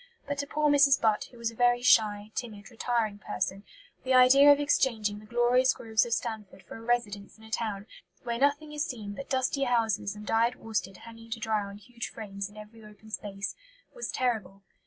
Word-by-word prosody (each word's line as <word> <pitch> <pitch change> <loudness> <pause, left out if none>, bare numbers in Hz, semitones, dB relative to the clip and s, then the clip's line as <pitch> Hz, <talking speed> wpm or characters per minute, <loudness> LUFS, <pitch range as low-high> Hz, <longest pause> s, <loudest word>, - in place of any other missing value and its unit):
But 285 0 -3
to 285 - -2
poor 300 +1 +1
Mrs. 280 -1 +5
Butt, 215 -2 +1
who 245 - -17
was 230 -1 -2
a - - -15
very 245 +1 +3
shy, 210 -3 +3
timid, 220 -2 -6
retiring 225 -3 -1
person, 190 0 -3 0.4
the 260 0 +2
idea 270 +3 +8
of 285 - +5
exchanging 225 -8 +1
"the 215 - -15
glorious 245 +3 +3
groves 225 0 +1
of 230 - -1
Stanford 215 -5 -4
for - - -11
a - - -11
residence 225 -4 -2
in 220 - -18
a 220 - -14
town, 210 -3 -3 0.4
where 235 0 -3
nothing 290 +2 +1
is 300 0 -1
seen 215 -7 -6
but 275 +6 -8
dusty 265 +1 0
houses 225 -4 0
and 210 0 -10
dyed 230 +3 +2
worsted 195 -4 -4
hanging 230 0 -12
to 225 0 -4
dry 220 -1 0
on 200 0 -8
huge 235 +2 -7
frames 200 -2 -6
in 205 - -17
every 215 +1 -12
open 210 +1 -15
space," 200 -2 -4 0.4
was 485 -1 -5
terrible. 210 -6 -2
225 Hz, 200 wpm, -28 LUFS, 210-250 Hz, 0.4 s, idea